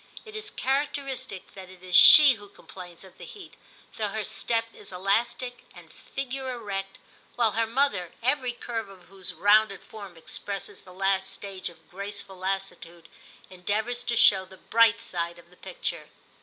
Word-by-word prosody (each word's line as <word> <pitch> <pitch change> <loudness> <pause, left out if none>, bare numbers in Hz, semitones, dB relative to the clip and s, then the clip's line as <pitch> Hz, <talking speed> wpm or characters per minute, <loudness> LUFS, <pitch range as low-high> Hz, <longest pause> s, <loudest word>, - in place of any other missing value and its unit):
It 435 0 -11
is 430 -1 -3
characteristic 270 - -3
that 190 -2 -11
it 185 -1 -15
is 180 -1 -2
she 290 +7 +11
who 205 -3 -12
complains 180 -3 -12
of 190 - -17
the - - -10
heat, 405 -3 -11 0.4
though 215 - 0
her 215 +2 -3
step 230 +3 -1
is 200 - -9
elastic 230 +7 -1
and - - -15
figure 265 -1 -5
erect, 195 -4 -5 0.4
while 230 -3 +2
her 225 +1 0
mother, 225 -8 0
every 255 0 +1
curve 230 -3 -5
of 185 -3 -16
whose 190 -1 -5
rounded 205 0 +3
form 200 -6 -11
expresses 195 +4 -6
the 185 - -15
last 190 +1 0
stage 195 -3 -6
of 175 - -19
graceful 200 0 -7
lassitude, 185 -3 -5 0.4
endeavours 215 +7 -2
to 235 -1 0
show 190 -3 +6
the 190 0 -14
bright 230 +2 +4
side 170 -4 -4
of 170 0 -18
the 180 - -20
picture. - - -5
200 Hz, 165 wpm, -27 LUFS, 190-240 Hz, 0.4 s, she